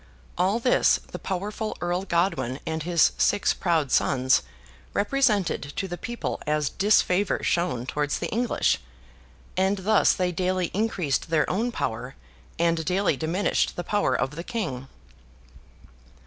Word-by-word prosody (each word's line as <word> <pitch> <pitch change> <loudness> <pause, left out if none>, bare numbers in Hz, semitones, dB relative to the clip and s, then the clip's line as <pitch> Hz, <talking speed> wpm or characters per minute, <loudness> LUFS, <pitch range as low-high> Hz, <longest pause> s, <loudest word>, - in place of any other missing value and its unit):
All 190 +5 +2
this, 245 +2 +3
the - - -6
powerful 210 +3 -4
Earl 175 +2 -1
Godwin 170 -8 0
and 160 0 -2
his 170 0 +3
six - - +3
proud 160 -7 0
sons 130 - +3 0.5
represented 210 -4 +1
to 195 - -2
the 175 - -4
people 240 +6 -4
as 150 -1 0
disfavour 200 -1 +2
shown 170 -9 0
towards 145 +2 -1
the - - -3
English; 240 +2 +1 0.8
and 190 +2 +2
thus 215 -1 +4
they 180 -1 0
daily 185 0 -1
increased 185 -9 -1
their 160 -2 +2
own 230 +6 0
power, 120 - -4 0.4
and 165 -1 +1
daily 185 0 +1
diminished 165 +7 0
the 175 - -4
power 205 +3 +1
of 135 - 0
the 170 - -5
King. 160 - -4
180 Hz, 135 wpm, -25 LUFS, 155-205 Hz, 0.8 s, thus